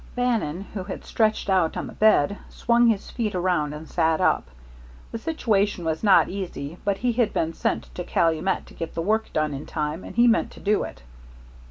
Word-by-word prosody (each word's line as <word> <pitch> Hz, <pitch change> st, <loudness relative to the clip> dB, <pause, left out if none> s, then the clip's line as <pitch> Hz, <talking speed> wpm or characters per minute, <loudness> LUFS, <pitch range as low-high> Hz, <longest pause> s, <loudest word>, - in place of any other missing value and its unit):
Bannon, 225 Hz, -10 st, 0 dB
who 190 Hz, -3 st, -4 dB
had 190 Hz, -, -7 dB
stretched 215 Hz, -2 st, +1 dB
out 185 Hz, -4 st, +2 dB
on -, -, -3 dB
the -, -, -9 dB
bed, 205 Hz, -4 st, +4 dB
swung 235 Hz, 0 st, +3 dB
his 215 Hz, -4 st, 0 dB
feet 215 Hz, -5 st, -2 dB
around 175 Hz, -5 st, +1 dB
and 150 Hz, +1 st, -8 dB
sat 160 Hz, -2 st, +1 dB
up. -, -, +2 dB, 0.6 s
The 230 Hz, -, -4 dB
situation 210 Hz, -, 0 dB
was 160 Hz, 0 st, -1 dB
not 205 Hz, -3 st, +5 dB
easy, 180 Hz, -5 st, -6 dB
but 200 Hz, -1 st, 0 dB
he 245 Hz, +2 st, +1 dB
had 225 Hz, -2 st, +1 dB
been 165 Hz, 0 st, 0 dB
sent -, -, -2 dB
to 180 Hz, -, -5 dB
Calumet 165 Hz, +3 st, +1 dB
to -, -, -16 dB
get 165 Hz, -, -6 dB
the 165 Hz, -, -1 dB
work 220 Hz, +4 st, 0 dB
done 155 Hz, -1 st, 0 dB
in 140 Hz, +2 st, -6 dB
time, 155 Hz, +2 st, -3 dB
and -, -, -9 dB
he 240 Hz, +1 st, +5 dB
meant 230 Hz, -, +3 dB
to -, -, -13 dB
do 210 Hz, +1 st, +1 dB
it. -, -, -11 dB
190 Hz, 205 wpm, -24 LUFS, 160-220 Hz, 0.6 s, not